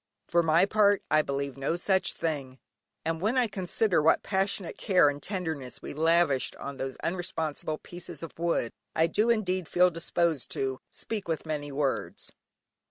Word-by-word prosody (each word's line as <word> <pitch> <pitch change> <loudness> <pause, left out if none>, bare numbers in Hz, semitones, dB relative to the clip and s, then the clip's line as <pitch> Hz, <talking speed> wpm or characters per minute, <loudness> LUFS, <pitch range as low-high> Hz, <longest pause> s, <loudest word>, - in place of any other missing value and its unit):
For 170 - +3
my 165 +2 +4
part 205 -1 +3
I 155 - +6
believe 140 -1 -3
no 135 +4 0
such 190 +2 +1
thing, 140 -5 -3 0.5
and 165 0 -1
when 220 +6 +1
I 250 - +4
consider 195 -2 +1
what 160 - +4
passionate 195 -2 0
care 180 -7 +4
and 145 0 -5
tenderness 160 -10 -4
we - - -6
lavished 160 -3 +2
on 140 0 -7
those 135 -1 -4
unresponsive 160 -3 -3
pieces 175 -1 -8
of 165 - -9
wood, 170 -8 0 0.2
I 160 - +4
do 210 +7 +1
indeed 185 -6 +1
feel 180 0 +4
disposed 165 -3 0
to 130 -1 -2
"speak 215 -5 -5
with 165 -1 -2
many 150 -2 -3
words." 140 -1 -2
165 Hz, 165 wpm, -28 LUFS, 145-185 Hz, 0.5 s, I